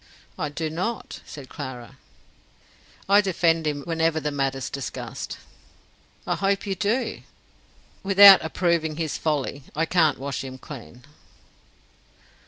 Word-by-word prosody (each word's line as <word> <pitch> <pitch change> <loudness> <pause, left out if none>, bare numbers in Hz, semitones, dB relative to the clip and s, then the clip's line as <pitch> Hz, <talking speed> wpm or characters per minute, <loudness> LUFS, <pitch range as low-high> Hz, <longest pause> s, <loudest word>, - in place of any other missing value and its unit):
"I 150 - -3
do 155 +1 -4
not," 185 +8 -4
said 140 -3 -9
Clara. 125 -2 -8 1.1
"I 200 +1 +6
defend 165 -4 +1
him 145 -1 -2
whenever 165 0 0
the 150 -1 -2
matter's 135 -2 -2
discussed." 140 -2 -6 0.9
"I - - 0
hope 195 +1 0
you 195 - -1
do." 210 +7 -1 0.8
"Without 195 0 +9
approving 160 -1 0
his 160 -2 -3
folly. 145 -2 -1
I 165 +2 +1
can't 160 -4 +3
wash 140 0 -4
him 130 -1 -8
clean." 125 -3 -11
160 Hz, 120 wpm, -24 LUFS, 140-185 Hz, 1.1 s, Without